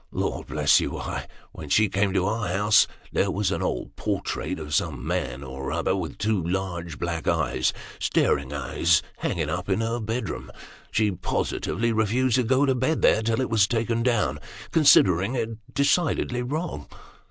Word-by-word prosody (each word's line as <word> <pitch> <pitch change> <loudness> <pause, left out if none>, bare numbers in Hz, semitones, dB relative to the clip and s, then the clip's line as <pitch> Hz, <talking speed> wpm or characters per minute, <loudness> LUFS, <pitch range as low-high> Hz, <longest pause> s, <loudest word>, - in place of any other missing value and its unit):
Lord - - -3
bless - - +4
you, - - -2
why - - -5 0.2
when 75 -2 -9
she 110 +8 +4
came 100 +1 +1
to 95 -1 +2
our 105 +1 -1
house, 105 +4 +4 0.2
there - - +1
was - - 0
an - - -2
old - - -3
portrait 95 - -3
of 75 -2 -6
some - - -1
man 65 +3 -2
or 65 0 -6
other, 95 - 0
with 85 -6 -4
two 105 -4 0
large 85 -2 -3
black 85 -2 -3 0.7
staring 70 -1 +1
eyes, 75 +3 +1
hanging - - -2
up - - -3
in - - +1
her 115 +1 -1
bedroom; 115 +3 -4 0.4
she 110 -2 +2
positively 115 +5 -1
refused 115 +3 +2
to 125 - +2
go 130 +4 +3
to 135 - +2
bed 130 +6 0
there, 110 - +5
till 115 +1 0
it 130 - -1
was 105 -3 +4
taken 115 0 0
down, 120 -2 +1 0.3
considering 105 - +5
it 115 -2 -1 0.2
decidedly 140 -4 +1
wrong." 145 - -4
110 Hz, 165 wpm, -25 LUFS, 85-120 Hz, 0.7 s, there